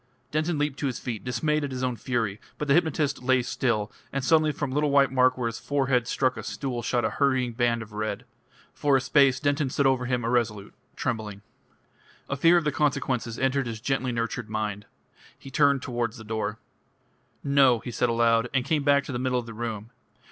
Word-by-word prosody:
Denton 155 Hz, +2 st, 0 dB
leaped 145 Hz, -1 st, -1 dB
to 145 Hz, -, 0 dB
his 125 Hz, -, -3 dB
feet, 115 Hz, -5 st, -5 dB
dismayed 150 Hz, +5 st, 0 dB
at 145 Hz, -, -2 dB
his 130 Hz, -1 st, -4 dB
own 125 Hz, -1 st, 0 dB
fury; 115 Hz, -5 st, -2 dB, 0.2 s
but 150 Hz, -, -3 dB
the 140 Hz, -, +4 dB
hypnotist 155 Hz, -4 st, +1 dB
lay 130 Hz, 0 st, +2 dB
still, 115 Hz, -4 st, -1 dB, 0.2 s
and 135 Hz, -1 st, -2 dB
suddenly 155 Hz, -2 st, +4 dB
from 145 Hz, -2 st, -4 dB
a -, -, -4 dB
little 150 Hz, +1 st, +1 dB
white 140 Hz, -1 st, +4 dB
mark 130 Hz, -1 st, +3 dB
where 125 Hz, -, -2 dB
his 115 Hz, 0 st, -3 dB
forehead 140 Hz, -2 st, -1 dB
had 120 Hz, -2 st, +2 dB
struck 130 Hz, 0 st, 0 dB
a -, -, -4 dB
stool 130 Hz, -4 st, -4 dB
shot 120 Hz, 0 st, 0 dB
a -, -, 0 dB
hurrying 130 Hz, -4 st, +1 dB
band 120 Hz, -1 st, +1 dB
of 110 Hz, -1 st, -15 dB
red. 110 Hz, +1 st, -3 dB, 0.5 s
For 140 Hz, -2 st, +2 dB
a -, -, +1 dB
space 135 Hz, -1 st, +3 dB
Denton 145 Hz, 0 st, 0 dB
stood 140 Hz, +2 st, 0 dB
over 130 Hz, -2 st, +2 dB
him 125 Hz, -2 st, -1 dB
irresolute, 115 Hz, -4 st, -1 dB, 0.2 s
trembling. 105 Hz, -4 st, -4 dB, 0.8 s
A 140 Hz, -, -2 dB
fear 165 Hz, +5 st, +5 dB
of 170 Hz, -, +1 dB
the 150 Hz, -, 0 dB
consequences 130 Hz, -5 st, -1 dB
entered 135 Hz, 0 st, 0 dB
his 115 Hz, -2 st, -5 dB
gently 130 Hz, +1 st, -1 dB
nurtured 115 Hz, -1 st, -3 dB
mind. 105 Hz, -2 st, -3 dB, 0.5 s
He 135 Hz, -, -12 dB
turned 140 Hz, -1 st, +3 dB
towards 120 Hz, -2 st, -2 dB
the 110 Hz, -, -10 dB
door. 110 Hz, 0 st, -3 dB, 0.9 s
"No," 140 Hz, -3 st, +4 dB
he 120 Hz, +2 st, -7 dB
said 120 Hz, +1 st, 0 dB
aloud, 115 Hz, 0 st, +2 dB
and 130 Hz, -1 st, +1 dB
came 150 Hz, +1 st, +1 dB
back 140 Hz, 0 st, +3 dB
to 140 Hz, -, -7 dB
the 120 Hz, -, -3 dB
middle 130 Hz, 0 st, 0 dB
of 120 Hz, -, -2 dB
the 115 Hz, -, -8 dB
room. 115 Hz, -1 st, -5 dB
130 Hz, 215 wpm, -26 LUFS, 115-140 Hz, 0.9 s, fear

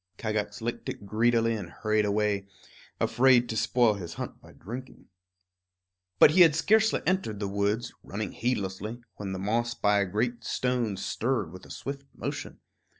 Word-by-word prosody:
Kagax 105 Hz, -2 st, -2 dB
licked 120 Hz, +1 st, -3 dB
it 100 Hz, -, -6 dB
greedily 115 Hz, +2 st, +2 dB
and 100 Hz, -6 st, -5 dB
hurried 110 Hz, -1 st, 0 dB
away, 105 Hz, -1 st, 0 dB, 0.5 s
afraid 125 Hz, -1 st, +4 dB
to 110 Hz, -, -2 dB
spoil 120 Hz, 0 st, +3 dB
his 90 Hz, -5 st, -7 dB
hunt -, -, -6 dB
by -, -, -15 dB
drinking. 125 Hz, +7 st, -9 dB, 1.1 s
But -, -, +8 dB
he 180 Hz, +4 st, +5 dB
had 160 Hz, -4 st, +7 dB
scarcely 220 Hz, +6 st, +3 dB
entered 180 Hz, -, 0 dB
the 100 Hz, -, -2 dB
woods, 100 Hz, +4 st, -1 dB
running 105 Hz, +1 st, -4 dB
heedlessly, 110 Hz, 0 st, -3 dB
when 100 Hz, -2 st, -5 dB
the 95 Hz, -, -3 dB
moss 115 Hz, +5 st, 0 dB
by 105 Hz, 0 st, +3 dB
a 100 Hz, -, +1 dB
great 120 Hz, +5 st, -1 dB
stone 125 Hz, -5 st, -1 dB
stirred 110 Hz, -2 st, -1 dB
with 95 Hz, +1 st, -11 dB
a -, -, -18 dB
swift 140 Hz, 0 st, -6 dB
motion. -, -, -5 dB
110 Hz, 160 wpm, -28 LUFS, 100-120 Hz, 1.1 s, But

